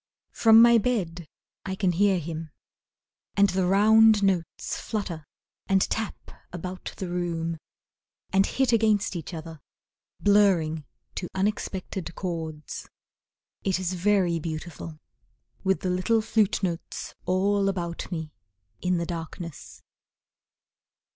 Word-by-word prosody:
From 225 Hz, 0 st, +7 dB
my 235 Hz, -1 st, +7 dB
bed 180 Hz, -8 st, -2 dB, 0.4 s
I 190 Hz, -1 st, -3 dB
can 190 Hz, -2 st, +1 dB
hear 195 Hz, +2 st, +3 dB
him, 165 Hz, -1 st, -5 dB, 0.9 s
And 200 Hz, -1 st, +5 dB
the 185 Hz, -1 st, +1 dB
round 215 Hz, +2 st, +6 dB
notes 185 Hz, -4 st, 0 dB
flutter 175 Hz, -8 st, -4 dB, 0.4 s
and 195 Hz, 0 st, +4 dB
tap 220 Hz, -2 st, -4 dB, 0.2 s
about 180 Hz, +1 st, -6 dB
the 190 Hz, -, -4 dB
room, 170 Hz, -2 st, -2 dB, 0.7 s
And 195 Hz, 0 st, +4 dB
hit 265 Hz, -2 st, +1 dB
against 215 Hz, -4 st, +2 dB
each 170 Hz, -, -5 dB
other, 160 Hz, -2 st, -8 dB, 0.6 s
Blurring 180 Hz, -7 st, +3 dB, 0.3 s
to 180 Hz, -, -4 dB
unexpected 190 Hz, -3 st, -2 dB
chords. 160 Hz, -5 st, -5 dB, 0.7 s
It 190 Hz, -2 st, +1 dB
is 185 Hz, -1 st, -2 dB
very 180 Hz, -2 st, +2 dB
beautiful, 160 Hz, 0 st, -6 dB, 0.7 s
With 190 Hz, 0 st, +1 dB
the 185 Hz, -, 0 dB
little 215 Hz, +5 st, +2 dB
flute 215 Hz, -3 st, +1 dB
notes 170 Hz, -2 st, -4 dB
all 195 Hz, +2 st, +2 dB
about 175 Hz, -2 st, -4 dB
me, 160 Hz, -3 st, -4 dB, 0.5 s
In 180 Hz, 0 st, +1 dB
the 170 Hz, -, -1 dB
darkness. 165 Hz, -1 st, -7 dB
185 Hz, 115 wpm, -26 LUFS, 170-200 Hz, 0.9 s, From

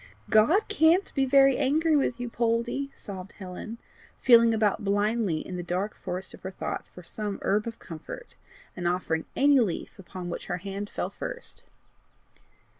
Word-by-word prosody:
"God 310 Hz, -, +5 dB
CAN'T 350 Hz, -1 st, +3 dB
be 270 Hz, -2 st, +2 dB
very 270 Hz, 0 st, +5 dB
angry 305 Hz, +3 st, +3 dB
with 260 Hz, -4 st, +1 dB
you, 245 Hz, -, -3 dB
Poldie," 235 Hz, +4 st, 0 dB
sobbed 190 Hz, -1 st, -8 dB
Helen, 195 Hz, +4 st, -7 dB, 0.4 s
feeling 235 Hz, -2 st, +7 dB
about 215 Hz, -2 st, +1 dB
blindly 205 Hz, -3 st, +1 dB
in 180 Hz, -, -5 dB
the -, -, -3 dB
dark 180 Hz, +4 st, -2 dB
forest 185 Hz, +2 st, -5 dB
of -, -, -13 dB
her 190 Hz, -, -5 dB
thoughts 190 Hz, -, -5 dB
for 180 Hz, -, -13 dB
some 205 Hz, +2 st, -4 dB
herb 210 Hz, +3 st, +1 dB
of 230 Hz, -, -5 dB
comfort, 165 Hz, -, -9 dB, 0.4 s
and 175 Hz, -2 st, -2 dB
offering 175 Hz, -2 st, -1 dB
any 285 Hz, 0 st, +5 dB
leaf 205 Hz, -3 st, -2 dB
upon 185 Hz, -1 st, -7 dB
which 175 Hz, -, -5 dB
her 175 Hz, -, -2 dB
hand 200 Hz, +2 st, -5 dB
fell -, -, -3 dB
first. 485 Hz, -, -6 dB
215 Hz, 165 wpm, -27 LUFS, 185-265 Hz, 0.4 s, feeling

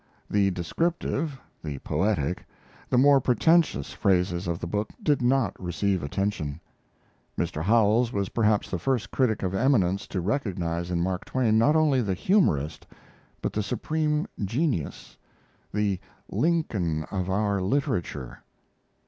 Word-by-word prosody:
The 100 Hz, -1 st, +3 dB
descriptive, 140 Hz, -, -2 dB, 0.2 s
the 75 Hz, -3 st, -4 dB
poetic, 85 Hz, +2 st, -1 dB, 0.5 s
the 125 Hz, -, +2 dB
more 140 Hz, +1 st, +6 dB
pretentious 125 Hz, -, +2 dB
phases 90 Hz, -2 st, +1 dB
of 85 Hz, -1 st, -1 dB
the -, -, -5 dB
book 105 Hz, +5 st, -2 dB
did 145 Hz, -6 st, +2 dB
not 130 Hz, +1 st, +2 dB
receive 95 Hz, +1 st, 0 dB
attention. 80 Hz, -2 st, -2 dB, 0.8 s
Mr. 75 Hz, -, -2 dB
Howells 115 Hz, +4 st, +3 dB
was 100 Hz, -4 st, -1 dB
perhaps 110 Hz, -2 st, +2 dB
the 90 Hz, -, -1 dB
first 110 Hz, +1 st, -1 dB
critic 120 Hz, -7 st, +1 dB
of 95 Hz, 0 st, -1 dB
eminence 100 Hz, -5 st, +2 dB
to 95 Hz, -, -3 dB
recognize 90 Hz, -6 st, -2 dB
in 85 Hz, -1 st, 0 dB
Mark 90 Hz, 0 st, -2 dB
Twain 115 Hz, -4 st, +2 dB
not 145 Hz, +7 st, +4 dB
only 150 Hz, -5 st, +3 dB
the 100 Hz, -5 st, -1 dB
humorist, 85 Hz, -, +1 dB, 0.6 s
but -, -, -1 dB
the 105 Hz, -, 0 dB
supreme 150 Hz, +8 st, -1 dB, 0.2 s
genius 115 Hz, -, -2 dB, 0.5 s
the 100 Hz, -2 st, 0 dB, 0.3 s
"Lincoln 105 Hz, -, 0 dB
of 95 Hz, -2 st, -2 dB
our 100 Hz, 0 st, +1 dB
literature." 95 Hz, -, -2 dB
105 Hz, 130 wpm, -26 LUFS, 90-130 Hz, 0.8 s, more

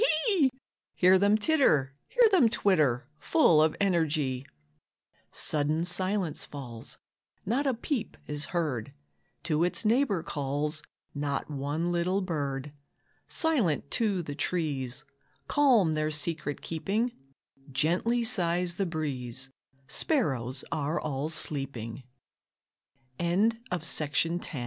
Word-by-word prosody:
Hear 185 Hz, +1 st, +5 dB
them 205 Hz, +2 st, +4 dB
titter, 205 Hz, -, +3 dB
hear -, -, +5 dB
them 290 Hz, -, +5 dB
twitter, 150 Hz, -, +2 dB
Full 175 Hz, -, +4 dB
of 155 Hz, 0 st, +3 dB
energy. 155 Hz, -8 st, +1 dB, 0.8 s
Sudden 155 Hz, +2 st, 0 dB
silence 185 Hz, -1 st, 0 dB
falls, 120 Hz, -5 st, -8 dB, 0.5 s
Not 255 Hz, +8 st, 0 dB
a 260 Hz, -, +1 dB
peep 245 Hz, +1 st, -3 dB
is 150 Hz, 0 st, -3 dB
heard; 150 Hz, -, -2 dB, 0.5 s
To 160 Hz, -1 st, +1 dB
its 180 Hz, +5 st, -1 dB
neighbor 220 Hz, -, +2 dB
calls 150 Hz, +1 st, -2 dB, 0.3 s
Not 145 Hz, +1 st, -3 dB
one 145 Hz, +5 st, -2 dB
little 180 Hz, +3 st, +1 dB
bird, 145 Hz, -5 st, -3 dB, 0.6 s
Silent 220 Hz, -, +1 dB
too 205 Hz, -6 st, +1 dB
the 145 Hz, -, -5 dB
trees 145 Hz, -6 st, -2 dB, 0.4 s
Calm 245 Hz, -, +4 dB
their 155 Hz, 0 st, 0 dB
secret 150 Hz, -1 st, -2 dB
keeping; 205 Hz, +9 st, -1 dB, 0.6 s
Gently 185 Hz, -, +1 dB
sighs 180 Hz, -6 st, +1 dB
the 195 Hz, -, 0 dB
breeze; 135 Hz, -5 st, -3 dB, 0.4 s
Sparrows 135 Hz, -, 0 dB
165 Hz, 90 wpm, -29 LUFS, 145-200 Hz, 0.8 s, Hear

